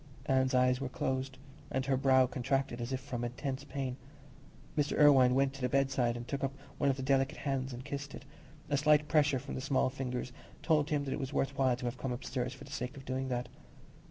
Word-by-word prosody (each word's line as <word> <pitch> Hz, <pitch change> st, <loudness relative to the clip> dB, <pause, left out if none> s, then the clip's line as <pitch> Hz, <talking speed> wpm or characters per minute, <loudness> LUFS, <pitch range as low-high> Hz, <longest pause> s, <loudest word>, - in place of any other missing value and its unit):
Anne's 130 Hz, -1 st, +2 dB
eyes 125 Hz, +1 st, +3 dB
were 135 Hz, -, -2 dB
closed, 130 Hz, +1 st, -2 dB, 0.3 s
and 130 Hz, 0 st, -1 dB
her 135 Hz, 0 st, +2 dB
brow 130 Hz, 0 st, +5 dB
contracted 130 Hz, 0 st, -1 dB
as 120 Hz, +2 st, -4 dB
if 130 Hz, -, -1 dB
from 125 Hz, -3 st, -5 dB
intense 130 Hz, +3 st, -3 dB
pain. 135 Hz, -3 st, -4 dB, 0.8 s
Mr. 150 Hz, -1 st, 0 dB
Irwine 135 Hz, -4 st, +7 dB
went 135 Hz, 0 st, +2 dB
to 135 Hz, -, -10 dB
the 125 Hz, -, +1 dB
bedside 135 Hz, -3 st, +1 dB
and 120 Hz, 0 st, -7 dB
took 140 Hz, +1 st, -3 dB
up 135 Hz, 0 st, -1 dB, 0.2 s
one 140 Hz, -, +3 dB
of 135 Hz, -, +1 dB
the 130 Hz, -, -4 dB
delicate 135 Hz, +2 st, +2 dB
hands 135 Hz, -2 st, -2 dB
and 125 Hz, +1 st, -7 dB
kissed 145 Hz, 0 st, -5 dB
it, 140 Hz, -, -11 dB, 0.4 s
a 145 Hz, 0 st, +1 dB
slight 150 Hz, +1 st, +4 dB
pressure 150 Hz, -2 st, +3 dB
from 135 Hz, +2 st, -6 dB
the -, -, -3 dB
small 130 Hz, -1 st, +1 dB
fingers 125 Hz, -1 st, -4 dB, 0.3 s
told 155 Hz, -2 st, +2 dB
him 150 Hz, -3 st, +1 dB
that 135 Hz, -, -2 dB
it -, -, -3 dB
was 135 Hz, 0 st, -4 dB
worth 135 Hz, +1 st, 0 dB
while 130 Hz, -2 st, +3 dB
to 125 Hz, -, -7 dB
have 120 Hz, +1 st, -3 dB
come 130 Hz, -, -2 dB
upstairs 125 Hz, 0 st, -3 dB
for 130 Hz, -, -10 dB
the -, -, -12 dB
sake 125 Hz, +4 st, -4 dB
of 135 Hz, -, -10 dB
doing 130 Hz, +1 st, -2 dB
that. 125 Hz, -1 st, -2 dB
135 Hz, 230 wpm, -32 LUFS, 125-140 Hz, 0.8 s, Irwine